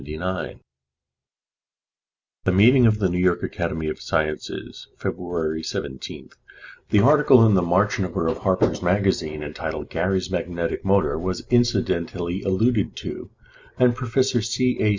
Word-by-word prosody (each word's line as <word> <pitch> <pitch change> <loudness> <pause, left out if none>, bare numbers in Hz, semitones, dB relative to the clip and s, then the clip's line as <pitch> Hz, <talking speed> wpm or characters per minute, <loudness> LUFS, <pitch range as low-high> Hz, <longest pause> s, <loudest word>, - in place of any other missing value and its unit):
At 70 - -13 2.4
the 95 - +3
meeting 120 +6 +6
of 110 -1 +2
the 100 -3 +1
New 90 0 -2
York 90 -1 +1
Academy 80 0 -3
of 75 - -4
Sciences 75 -1 -3
February 85 -3 -3
17th, 65 -4 -7 0.6
the 105 - +4
article 135 -2 +6
in 110 - +4
the 95 - +4
March 95 +5 +1
number 90 -3 -2
of - - -1
Harper's 95 -2 +1
Magazine, 90 -5 0
entitled 75 +1 -6
"Gary's 95 0 -1
Magnetic 85 -1 -3
Motor," 95 -4 +2
was 90 +2 -4
incidentally 95 -6 0
alluded 105 +3 0
to, - - -7 0.5
and 125 -1 +4
Prof. 130 +1 0
C. 125 0 0
A. 105 - +2
95 Hz, 130 wpm, -23 LUFS, 85-115 Hz, 2.4 s, meeting